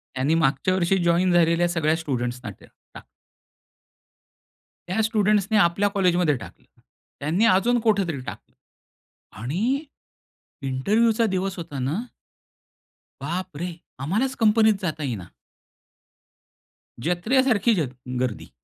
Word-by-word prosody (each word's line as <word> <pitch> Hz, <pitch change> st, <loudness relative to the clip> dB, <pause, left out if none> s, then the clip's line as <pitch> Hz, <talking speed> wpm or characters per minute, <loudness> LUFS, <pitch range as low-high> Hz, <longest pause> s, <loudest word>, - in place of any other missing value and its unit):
त्यांनी 135 Hz, +5 st, +1 dB
मागच्या 135 Hz, +5 st, +1 dB
वर्षी 185 Hz, +1 st, +2 dB
जॉईन 175 Hz, +2 st, +3 dB
झालेल्या 170 Hz, 0 st, +3 dB
सगळ्या 160 Hz, -2 st, +1 dB
स्टुडंट्सना 125 Hz, -5 st, -3 dB
त्यात -, -, -18 dB, 0.2 s
टा -, -, -9 dB, 1.9 s
त्या 190 Hz, +5 st, 0 dB
स्टुडंट्सने 215 Hz, -1 st, +2 dB
आपल्या 200 Hz, +2 st, +3 dB
कॉलेजमध्ये 180 Hz, -6 st, +2 dB
टाकलं. -, -, -12 dB, 0.5 s
त्यांनी 165 Hz, +10 st, +1 dB
अजून 230 Hz, +4 st, +3 dB
कुठेतरी 200 Hz, -8 st, +1 dB
टाकलं 130 Hz, -, -10 dB, 0.9 s
आणि 220 Hz, -, -1 dB, 0.8 s
इंटरव्ह्यूचा 215 Hz, -, +2 dB
दिवस 190 Hz, -2 st, -2 dB
होता 155 Hz, -5 st, -6 dB
ना 150 Hz, -, -2 dB, 1.2 s
बापरे! 175 Hz, +1 st, -4 dB, 0.3 s
आम्हालाच 220 Hz, -, 0 dB
कंपनीत 220 Hz, -2 st, +4 dB
जाता 160 Hz, -4 st, -3 dB
येईना. 115 Hz, -10 st, -4 dB, 1.8 s
जत्रेसारखी 225 Hz, -, +2 dB
जर 155 Hz, -8 st, -1 dB, 0.3 s
गर्दी. 125 Hz, -4 st, -3 dB
180 Hz, 100 wpm, -24 LUFS, 155-215 Hz, 1.9 s, कंपनीत